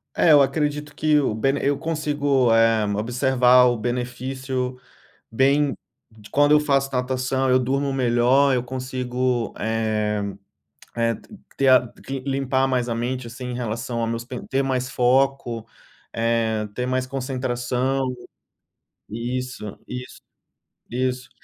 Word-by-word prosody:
É, 165 - +4
eu 145 - +8
acredito 150 +1 -1
que 155 0 +2
o 130 -6 0
bene 135 +6 0
eu 140 0 +2
consigo, 145 -6 +1
eh, 115 -1 +4
observar 125 +2 +4
o 120 -1 +1
benefício 125 +2 -3 0.5
bem 140 +3 +2 0.3
de 110 -2 -17
quando 145 +1 +4
eu 150 - +7
faço 140 -2 +1
natação 130 +1 -1
eu 130 0 +4
durmo 135 +2 0
melhor, 130 +2 +3
eu 125 - 0
consigo, 125 -1 -2
eh 110 -2 -1 0.7
eh, 115 -1 +1 0.4
ter 135 - +1
a 130 -2 +6
cle 135 -1 -5
limpar 135 -1 +1
mais 125 -2 0
a 115 - -1
mente, 125 +1 -3
assim, 125 +2 -8
em - - -4
relação 120 0 -3
ao 115 - 0
meus 115 +1 -3 0.2
ter 135 +1 +1
mais 130 -1 -1
foco, 125 -2 +1 0.4
eh, 115 -2 0
ter 125 0 -3
mais 130 0 0
concentração 130 0 -2 1.1
isso, 120 -1 -5
isso, 125 0 -8 0.7
isso. 125 +2 -2
125 Hz, 130 wpm, -23 LUFS, 120-135 Hz, 1.1 s, eu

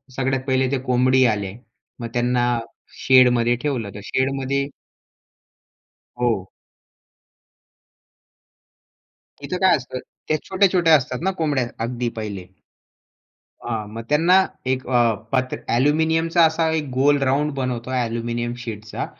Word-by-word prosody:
सगळ्यात 135 0 -1
पहिले 130 -1 +2
ते 140 - +1
कोंबडी 130 +1 +3
आले, 100 -2 -4 0.5
मग 120 - -4
त्यांना 120 0 +1 0.6
शेडमध्ये 125 -2 +5
ठेवलं 130 -8 -2
तर - - -6
शेडमध्ये 135 +3 -1 1.5
हो. - - 0 2.9
इथं 180 - -3
काय 190 - +5
असतं 130 -1 -7 0.3
त्या 155 - +1
छोट्या-छोट्या 185 -4 +4
असतात 130 -3 -1
ना 190 - +1
कोंबड्या 140 -6 +1 0.2
अगदी 120 +1 -2
पहिले 105 -4 -5 1.3
हां, 110 -3 -3
मग 115 - -5
त्यांना 175 +6 +4 0.3
एक 130 0 -5
अ, 120 -2 +3 0.2
पात्र 130 -1 0 0.2
ॲल्युमिनियमचा 160 +5 +2
असा 160 0 +1
एक 155 -3 -2
गोल 140 +3 +3
राउंड 140 +3 +1
बनवतो 125 -1 -3
ॲल्युमिनियम 120 -1 -2
शीटचा 110 -3 -6
130 Hz, 115 wpm, -22 LUFS, 120-150 Hz, 2.9 s, शेडमध्ये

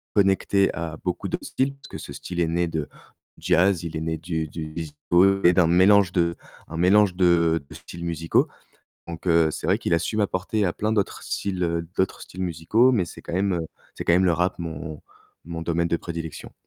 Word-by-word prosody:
connecté 100 -1 +3
à 85 -2 -4
beaucoup 90 -1 -2
de - - -2
styles, 135 +1 -1
parce 140 - -15
que - - -7
ce - - -9
style 90 -1 -6
est 85 - +2
né 85 +1 0
de 80 -3 -3 0.5
jazz, 90 0 +2
il 80 -1 -4
est - - -2
né 80 0 -2
du 80 -1 -3
du 80 +1 -6
disco 85 +5 +1
et 90 - +7
d'un 85 -2 +4
mélange 95 +1 +5
de 85 -1 +1 0.3
un 80 - -6
mélange 95 +2 +4
de 85 -3 +3
de - - -11
styles 85 0 -9
musicaux, 80 -1 +1 0.6
donc 85 +2 -8
heu, 85 -2 +4
c'est - - -5
vrai - - +3
qu'il - - -3
a 85 - +5
su 105 +5 -3
m'apporter, 105 +1 0
à 90 - +1
plein 105 +4 -2
d'autres 105 -3 -1
styles, 95 -3 -3
heu, 85 -1 -1
d'autres 95 - 0
styles 95 +1 -7
musicaux, 95 +9 +2
mais 105 -7 +2
c'est 85 - -11
quand - - -7
même, 95 +1 +1
heu, 85 -2 -2 0.3
c'est - - -6
quand 85 - +5
même 95 +2 +4
le 90 - +4
rap 90 +3 0
mon 80 -2 -6 0.4
mon 85 0 -6
domaine 85 +1 0
de 85 - 0
prédilection. 80 -2 -7
85 Hz, 215 wpm, -24 LUFS, 80-95 Hz, 0.6 s, et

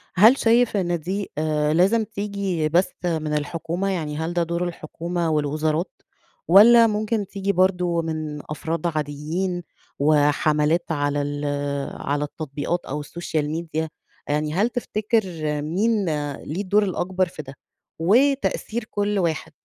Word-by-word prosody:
هل 220 +8 +7
شايف 230 -1 +3
إن 175 -3 0
دي 195 +5 -4
آآ، 150 -1 +1
لازم 195 +7 +3
تيجي 200 -6 -2
بس 175 +4 +2
من 155 -3 -1
الحكومة؟ 165 +5 -2
يعني 155 -6 -2
هل 160 +2 -2
ده 175 -1 +1
دور 170 +1 -1
الحكومة 170 +1 -3
والوزارات، 155 +3 0 0.6
والّا 230 +6 +8
ممكن 215 -1 -1
تيجي 200 0 -2
برضه 180 -2 +2
من 155 -2 -4
أفراد 165 +2 -2
عاديين 155 +4 -2 0.4
وحملات 150 +2 +3
على 145 -1 0
ال 145 +1 -3 0.6
على 145 +1 -1
التطبيقات 150 +3 -3
أو 145 +3 -4
السوشيال 150 -1 -3
ميديا، 160 0 -3 0.4
يعني 150 +1 0
هل 205 +7 +2
تفتكر 225 -2 0 0.4
مين 200 +7 +1 0.3
ليه 160 +7 -5
الدور 205 +2 +2
الأكبر 185 -1 0
في 165 - -8
ده، 135 -2 -10 0.5
وتأثير 240 +3 +2
كل 205 -1 -1
واحد؟ 165 -2 -1
170 Hz, 130 wpm, -23 LUFS, 155-200 Hz, 0.6 s, والّا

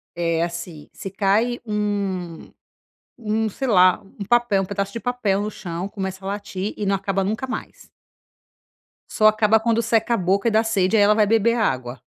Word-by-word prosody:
é 170 -1 0
assim, 170 -2 -6
se 195 - -7
cai 215 +5 +1
um 200 -5 -3 0.7
um 220 -1 -1
sei 260 +6 -4
lá, 185 -1 +4
um 200 +1 -10
papel, 240 -5 +3
um - - -2
pedaço 200 0 -3
de 230 - -4
papel 225 -6 0
no 210 +1 -3
chão 180 -2 -6
começa 190 -1 -6
a - - -4
latir 205 0 -4
e 210 - -3
não 195 0 +1
acaba 195 0 -1
nunca 215 +7 -2
mais. 260 - -7 1.2
Só 215 - +3
acaba 215 0 +4
quando 230 +1 +1
seca 225 +1 +1
a - - -1
boca 195 +4 +1
e - - -3
dá 220 +1 +3
sede, 220 -1 +1
aí 205 - +5
ela 210 +1 +4
vai 215 -1 +4
beber 225 +2 +2
água, 130 - -1
205 Hz, 190 wpm, -22 LUFS, 190-220 Hz, 1.2 s, aí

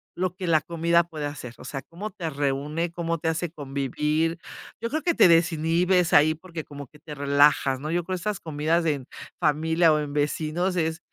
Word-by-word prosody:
lo 185 0 -2
que 185 - -5
la 155 -2 +4
comida 170 0 +2
puede 155 -3 -6
hacer, 135 -5 -7
o - - -12
sea, 135 - -5
cómo 185 +9 -7
te 170 -3 -5
reúne, 145 +3 -2
cómo 170 -1 -2
te 160 - -1
hace 165 +1 -2
convivir, 150 +3 -1 0.4
yo 230 - -2
creo 310 +4 -2
que 340 0 +1
te - - +7
desinhibes 170 +2 +3
ahí, 155 +2 +5
porque 165 -1 -8
como 145 -2 -9
que 150 - -20
te 150 -1 -9
relajas, 140 -1 +3
¿no?, 155 +3 -4
yo 175 +1 0
creo 185 +2 -3
esas 205 +3 -3
comidas 160 +2 0
de 160 -2 +2
en 135 -3 -9 0.3
familia 160 +1 +3
o 150 - +2
en 145 -1 -4
vecinos 155 +5 -1
es 160 -1 -1
160 Hz, 205 wpm, -25 LUFS, 150-170 Hz, 0.4 s, te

